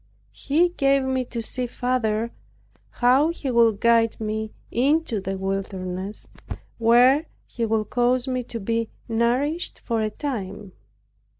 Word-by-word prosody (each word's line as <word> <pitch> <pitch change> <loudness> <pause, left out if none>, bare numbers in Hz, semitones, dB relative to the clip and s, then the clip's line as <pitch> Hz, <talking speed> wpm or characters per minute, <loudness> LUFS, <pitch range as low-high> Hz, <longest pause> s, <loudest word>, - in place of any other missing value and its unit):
He 325 +5 +1
gave 275 -5 +2
me 260 -1 0
to 235 -1 -5
see 250 +2 -4
farther 235 -2 -1 0.6
how 260 +6 +3
He 300 -6 -3
would 230 -3 +4
guide 230 -1 +3
me 220 0 -3 0.2
into 265 -3 +1
the 195 0 -3
wilderness, 190 0 -4 0.5
where 245 +7 +5 0.2
He 230 -2 -3
would 215 -1 -1
cause 245 +1 +2
me 255 -1 -1
to 235 - -6
be 230 +2 -1 0.2
nourished 250 +9 0
for 230 -2 -1
a 215 - 0
time. 210 -6 -5
235 Hz, 130 wpm, -24 LUFS, 215-260 Hz, 0.6 s, where